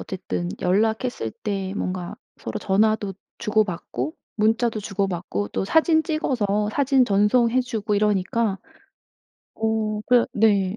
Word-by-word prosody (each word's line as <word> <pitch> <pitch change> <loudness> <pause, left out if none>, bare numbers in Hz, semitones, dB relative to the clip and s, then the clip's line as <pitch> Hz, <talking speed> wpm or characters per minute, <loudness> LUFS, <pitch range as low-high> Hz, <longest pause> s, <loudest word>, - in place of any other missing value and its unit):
어쨌든 180 -2 -4
연락했을 220 - 0
때 195 - -4
뭔가 185 +1 -3 0.2
서로 - - -5
전화도 205 0 +1 0.2
주고받고 180 - -1 0.2
문자도 225 +1 +1
주고받고 185 - -2
또 190 - -2
사진 320 - +3
찍어서 215 -10 0
사진 270 -1 +3
전송해 230 +4 +3
주고 220 -4 -2
이러니까 205 0 +1 1.0
어 220 -1 -1
그러 245 -1 +4
네. 200 -2 +3
210 Hz, 260 characters per minute, -23 LUFS, 195-230 Hz, 1.0 s, 그러